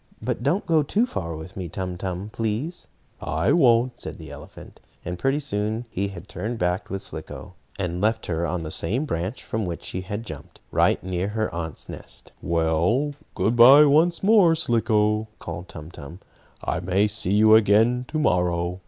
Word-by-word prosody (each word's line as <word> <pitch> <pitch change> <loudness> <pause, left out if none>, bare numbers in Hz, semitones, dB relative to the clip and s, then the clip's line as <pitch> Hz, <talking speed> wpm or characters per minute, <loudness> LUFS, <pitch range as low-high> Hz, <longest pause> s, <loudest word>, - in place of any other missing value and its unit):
"But - - -3
don't 170 +9 0
go 160 -3 +3
too 200 - +1
far 85 - -5
with 80 +4 -9
me, 90 -3 -5
Tum 90 +1 -4
Tum, 95 +2 -5
please." 115 +10 -3 0.3
"I 80 +2 0
won't," 125 -5 +4
the - - -8
elephant - - -12
said. - - -35
And 90 0 -4
pretty 135 +1 +1
soon 110 -3 -2
he 100 +1 -2
turned 100 +5 -6
back 90 0 -1
with 95 0 -4
Slicko, 80 0 -7 0.2
and 90 -2 -3
left 110 +1 +1
her 85 0 -1
on 85 -1 -3
the 80 - -6
same 115 - -1
branch 95 - -4
from 110 0 -3
which 85 -3 -5
she 90 - -4
had 105 +4 -5
jumped 75 - -10
right - - +2
near 90 0 -2
her 110 +1 -2
aunt's 80 -2 -5
nest. - - -9
"Well, 85 - +1 0.2
good 115 - +1
bye 135 +6 +9
once 165 +5 +3
more, 195 -5 +5
Slicko," 110 -6 +1
called 85 +2 -7
Tum 75 +3 -9
Tum. 80 +3 -10 0.4
"I - - -1
may 95 +4 +1
see 105 -2 0
you 110 +1 +6
again 110 +4 +4
to 155 - -3
morrow. 90 - 0
105 Hz, 180 wpm, -24 LUFS, 90-120 Hz, 0.4 s, bye